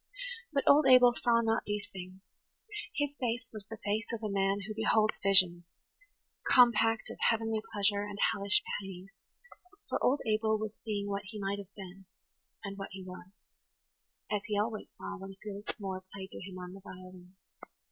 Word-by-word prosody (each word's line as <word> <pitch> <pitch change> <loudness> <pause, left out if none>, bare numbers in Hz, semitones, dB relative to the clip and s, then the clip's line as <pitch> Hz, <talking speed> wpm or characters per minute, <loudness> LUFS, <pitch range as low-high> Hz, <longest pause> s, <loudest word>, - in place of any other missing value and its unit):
But 280 -2 +1
old 290 0 +6
Abel 250 -2 +8
saw 235 -1 +3
not 225 -1 +1
these 205 0 -2
things; 185 0 -9 0.7
his 290 -1 0
face 240 -1 -1
was 210 -2 -8
the 225 - -7
face 215 +2 0
of 230 -1 -4
a 210 - -1
man 195 +1 +1
who 215 +2 -5
beholds 220 0 +2
visions, 185 -3 +5 0.8
compact 225 -2 +4
of - - -10
heavenly 225 -1 0
pleasure 205 0 +2
and 205 0 -5 0.2
hellish 200 +1 +3 0.2
pain, 190 -1 -9 0.8
for - - -1
old 275 +3 +3
Abel 220 0 +2
was 215 0 -3
seeing 205 -2 -2
what 200 0 -3
he 210 +2 -7
might 200 0 -2
have 200 -1 -10
been–and 195 +1 -12
what 195 - -5
he 190 -1 -7
was; 185 0 -10 1.0
as 205 -1 +1
he 210 -2 0
always 215 +1 -1
saw 205 - -6
when 195 0 -8
Felix 205 +2 -6
Moore 190 -2 -4
played 190 -1 -8
to - - -6
him 185 -1 -8
on 180 0 -7
the 195 - -11
violin. 185 -1 -12
205 Hz, 170 wpm, -32 LUFS, 195-220 Hz, 1.0 s, Abel